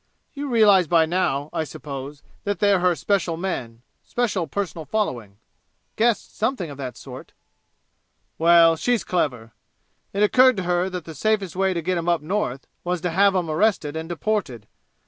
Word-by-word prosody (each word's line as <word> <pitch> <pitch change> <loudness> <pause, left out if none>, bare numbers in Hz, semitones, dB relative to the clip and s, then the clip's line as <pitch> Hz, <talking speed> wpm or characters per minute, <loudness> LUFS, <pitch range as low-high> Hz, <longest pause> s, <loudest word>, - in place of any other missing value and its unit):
"You 285 -1 -5
realize 205 -7 +5
by 165 0 +4
now, 155 -4 -1
I - - -1
suppose, 140 -1 -8 0.2
that 205 -1 -2
they're 200 0 +3
her 180 -1 +2
special 185 -3 0
men 125 -11 -5 0.2
special 210 -8 -1
personal 170 -1 -4
following?" 120 - -3 0.6
"Guessed 230 0 0
something 215 - -2
of 140 - -10
that 130 -2 -6
sort." - - -11 1.1
"Well 165 0 +6
she's 240 0 0
clever. 125 -10 -2 0.6
It 200 +1 0
occurred 255 +3 +5
to 190 - -2
her 180 +1 0
that 180 -3 -6
the 160 - -8
safest 200 +2 -1
way 190 0 +1
to 170 - -2
get 180 +1 0
'em 170 +1 -2
up 170 -3 +1
North 155 -7 -2 0.2
was 180 -1 -2
to 180 -1 -1
have 195 +3 +3
'em 180 -3 0
arrested 160 -2 0
and 160 +1 -5
deported. 175 - -2
175 Hz, 165 wpm, -23 LUFS, 155-200 Hz, 1.1 s, Well